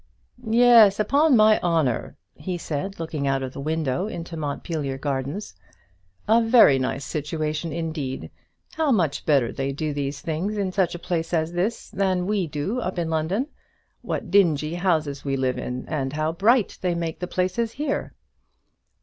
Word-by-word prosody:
"Yes, 230 Hz, -3 st, +6 dB
upon 280 Hz, +5 st, +4 dB
my 215 Hz, 0 st, +6 dB
honour," 160 Hz, -9 st, 0 dB, 0.2 s
he 175 Hz, +4 st, -5 dB
said, 170 Hz, +4 st, -4 dB
looking 155 Hz, -4 st, -3 dB
out 135 Hz, -1 st, 0 dB
of 130 Hz, -1 st, -5 dB
the -, -, -8 dB
window 155 Hz, +3 st, -1 dB
into 170 Hz, -5 st, -7 dB
the 165 Hz, -, -5 dB
Montpelier 145 Hz, -2 st, -3 dB
Gardens, 140 Hz, +7 st, -3 dB, 0.7 s
"a 225 Hz, +2 st, +5 dB
very 225 Hz, -, +6 dB
nice 135 Hz, +1 st, -2 dB
situation 155 Hz, +2 st, -3 dB
indeed. 155 Hz, -5 st, -4 dB, 0.4 s
How 315 Hz, -3 st, +1 dB
much 170 Hz, -, 0 dB
better 135 Hz, -6 st, +3 dB
they 135 Hz, 0 st, -2 dB
do 150 Hz, +2 st, -3 dB
these 140 Hz, 0 st, -3 dB
things 175 Hz, +7 st, -3 dB
in 195 Hz, -2 st, -1 dB
such 185 Hz, -3 st, 0 dB
a 175 Hz, -, -10 dB
place 170 Hz, -1 st, -1 dB
as 160 Hz, 0 st, 0 dB
this 195 Hz, +7 st, -2 dB
than 185 Hz, -2 st, 0 dB
we 200 Hz, -3 st, 0 dB
do 155 Hz, +11 st, -2 dB
up 185 Hz, -6 st, -3 dB
in 165 Hz, -2 st, -1 dB
London! 165 Hz, -, 0 dB, 0.6 s
What 190 Hz, -, -4 dB
dingy 160 Hz, -6 st, +3 dB
houses 160 Hz, -6 st, 0 dB
we 135 Hz, -1 st, -1 dB
live 130 Hz, -1 st, 0 dB
in, 125 Hz, 0 st, -5 dB
and 135 Hz, -3 st, -2 dB
how 155 Hz, +1 st, 0 dB
bright 215 Hz, +6 st, +2 dB
they 180 Hz, -2 st, 0 dB
make 165 Hz, -1 st, -3 dB
the 180 Hz, -, -3 dB
places 185 Hz, +6 st, -1 dB
here!" 285 Hz, 0 st, -3 dB
165 Hz, 165 wpm, -24 LUFS, 145-195 Hz, 0.7 s, Yes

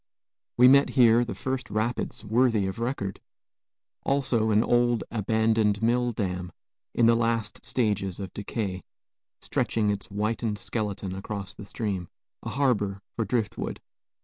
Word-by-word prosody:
We 125 Hz, +1 st, +8 dB
met 140 Hz, +2 st, +6 dB
here 120 Hz, -1 st, +6 dB
the 120 Hz, -, -5 dB
first 130 Hz, -1 st, -3 dB
rapids 110 Hz, +1 st, -2 dB
worthy 115 Hz, -1 st, +3 dB
of 95 Hz, +4 st, -4 dB
record; 115 Hz, -5 st, -3 dB, 0.8 s
also 130 Hz, -5 st, +1 dB
an 110 Hz, +1 st, +4 dB
old, 120 Hz, -1 st, +2 dB
abandoned 110 Hz, -1 st, +1 dB
mill 120 Hz, +1 st, +2 dB
dam, 90 Hz, -5 st, -3 dB, 0.4 s
in 120 Hz, -, +4 dB
the 115 Hz, -, +6 dB
last 115 Hz, -2 st, -1 dB
stages 100 Hz, -6 st, -1 dB
of 95 Hz, -2 st, -6 dB
decay, 100 Hz, -2 st, -3 dB, 0.6 s
stretching 105 Hz, -2 st, 0 dB
its 100 Hz, -1 st, -4 dB
whitened 105 Hz, +1 st, -1 dB
skeleton 100 Hz, -4 st, -3 dB
across 100 Hz, 0 st, -5 dB
the 100 Hz, -, -10 dB
stream, 100 Hz, -4 st, -3 dB, 0.3 s
a -, -, -5 dB
harbor 105 Hz, -8 st, 0 dB
for 115 Hz, -, -1 dB
driftwood. 110 Hz, 0 st, -2 dB
110 Hz, 135 wpm, -27 LUFS, 100-120 Hz, 0.8 s, We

